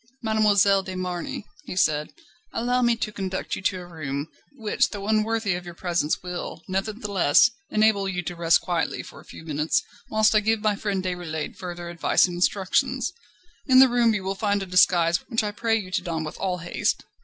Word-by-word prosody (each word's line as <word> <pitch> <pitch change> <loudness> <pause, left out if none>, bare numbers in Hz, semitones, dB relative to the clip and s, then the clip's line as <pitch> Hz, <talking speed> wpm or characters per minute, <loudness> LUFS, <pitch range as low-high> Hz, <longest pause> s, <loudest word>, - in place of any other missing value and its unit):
"Mademoiselle 205 -3 +4
de 190 -1 -7
Marny," 180 +2 -4 0.2
he - - -6
said, 150 -5 +1 0.4
"allow 245 +2 +1
me 235 -1 +3
to 225 -2 -3
conduct 190 -2 -3
you - - -7
to 190 -1 0
a 180 - -9
room, 150 -4 -5 0.3
which 275 +3 0
though 205 -1 -6
unworthy 220 -1 +1
of 175 0 -4
your 175 -1 -9
presence 170 -3 -1
will, 180 -2 -6
nevertheless, 200 -2 +2 0.2
enable 215 -2 +2
you 180 -1 -3
to 175 +1 -5
rest 170 0 +3
quietly 175 -3 -2
for - - -12
a - - -14
few - - -12
minutes, 155 - 0 0.3
whilst 215 0 +3
I 215 - +5
give 220 +1 +1
my 210 -1 +2
friend 200 -2 -2
Déroulède 175 -4 -4
further 175 -2 -7
advice 170 -1 +3
and 180 - -5
instructions. 185 +2 0 0.5
In 260 -2 +5
the 265 0 +9
room 235 -2 +3
you 200 - -3
will 190 +1 -1
find 200 0 0
a - - -5
disguise, 175 -2 +4
which 225 -3 +1
I 210 - -2
pray 225 +2 0
you 195 -4 -4
to - - 0
don 165 -2 -3
with 155 - -7
all 185 -2 -1
haste. 175 0 -1
190 Hz, 200 wpm, -25 LUFS, 175-215 Hz, 0.5 s, the